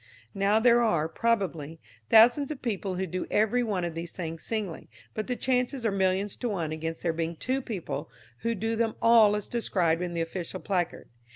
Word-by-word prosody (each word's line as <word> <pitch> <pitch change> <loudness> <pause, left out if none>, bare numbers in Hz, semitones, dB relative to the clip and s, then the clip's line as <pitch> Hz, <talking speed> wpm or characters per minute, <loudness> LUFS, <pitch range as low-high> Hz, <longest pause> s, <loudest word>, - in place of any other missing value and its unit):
Now 200 +1 +2
there 240 +1 +5
are, 170 -9 +2
probably, 165 -7 -1 0.3
thousands 240 +5 +6
of 300 -4 -6
people 200 -5 -2
who 190 +1 -1
do 185 +1 -4
every 220 +4 +2
one 205 -6 -1
of 170 - -4
these 165 +1 -6
things 165 -2 -5
singly, 210 -7 -4 0.2
but 215 - -4
the 250 - -1
chances 250 0 0
are 220 - +2
millions 190 +1 0
to 245 - -2
one 170 -7 -2
against 160 +1 -4
there 170 -2 +1
being 165 +1 -2
two 260 +10 -2
people 175 - -5 0.3
who 230 0 -1
do 225 +3 -1
them 225 -1 0
all 225 -3 +6
as 210 - -4
described 180 -8 0
in 175 -1 -3
the 165 - 0
official 175 +2 -4
placard. 180 -3 -2
200 Hz, 195 wpm, -28 LUFS, 170-230 Hz, 0.3 s, thousands